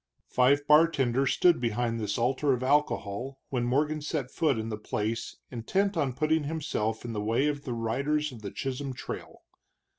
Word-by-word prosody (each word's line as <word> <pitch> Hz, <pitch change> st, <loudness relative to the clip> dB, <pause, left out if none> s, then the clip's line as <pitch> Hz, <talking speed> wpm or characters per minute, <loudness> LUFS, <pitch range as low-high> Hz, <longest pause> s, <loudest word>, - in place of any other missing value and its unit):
Five 140 Hz, +3 st, +3 dB
bartenders 140 Hz, -4 st, +4 dB
stood 175 Hz, -7 st, +4 dB
behind 115 Hz, 0 st, 0 dB
this 105 Hz, -2 st, -2 dB
altar 130 Hz, +4 st, +2 dB
of 125 Hz, 0 st, -2 dB
alcohol 135 Hz, -2 st, 0 dB
when 125 Hz, -3 st, -1 dB
Morgan 150 Hz, +5 st, +1 dB
set 145 Hz, -3 st, -3 dB
foot 150 Hz, -7 st, +1 dB
in 110 Hz, 0 st, -3 dB
the 105 Hz, -, -3 dB
place 110 Hz, +2 st, -3 dB
intent 190 Hz, -, 0 dB
on 145 Hz, -6 st, 0 dB
putting 155 Hz, +1 st, +1 dB
himself 140 Hz, -8 st, -2 dB
in 115 Hz, -, -4 dB
the 105 Hz, -, -2 dB
way 115 Hz, +6 st, +1 dB
of 145 Hz, -1 st, -2 dB
the 125 Hz, -, -3 dB
riders 140 Hz, +7 st, 0 dB
of 120 Hz, -4 st, -11 dB
the 100 Hz, -, -5 dB
Chisholm 135 Hz, +4 st, -4 dB
Trail. -, -, -8 dB
130 Hz, 175 wpm, -28 LUFS, 115-150 Hz, -, bartenders